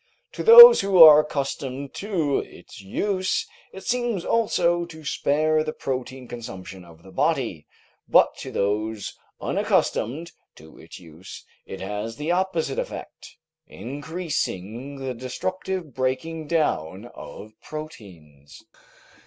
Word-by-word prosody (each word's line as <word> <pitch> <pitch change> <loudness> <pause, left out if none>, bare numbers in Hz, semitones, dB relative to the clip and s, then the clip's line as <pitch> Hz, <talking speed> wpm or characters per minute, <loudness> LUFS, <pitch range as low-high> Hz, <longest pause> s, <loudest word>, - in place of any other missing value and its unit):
To - - -7
those 475 +1 +11
who 195 -2 +1
are 155 -2 +10
accustomed 140 -2 -4
to 170 -9 -1
its 115 - -12
use, 185 - -2 0.3
it 190 - -11
seems 240 -7 -2
also 175 -6 +1
to 160 -2 -13
spare 155 +2 +1
the 155 0 -5
protein 130 -1 -5
consumption 95 -6 -9
of 85 -1 -17
the 95 - -14
body, 135 - -1 0.4
but - - +4
to - - -8
those 105 +1 -2 0.2
unaccustomed 160 +9 -1 0.2
to 80 0 -16
its - - -12
use 85 +2 -13 0.2
it 95 - -8
has 105 +3 -5
the 150 +5 -3
opposite 185 - -1
effect, - - -8 0.3
increasing 140 - -5
the 135 -1 -5
destructive 170 +6 -5
breaking 135 +5 -3
down 110 - -1
of 110 - -11
proteins. 85 - -11
140 Hz, 120 wpm, -23 LUFS, 105-170 Hz, 0.4 s, those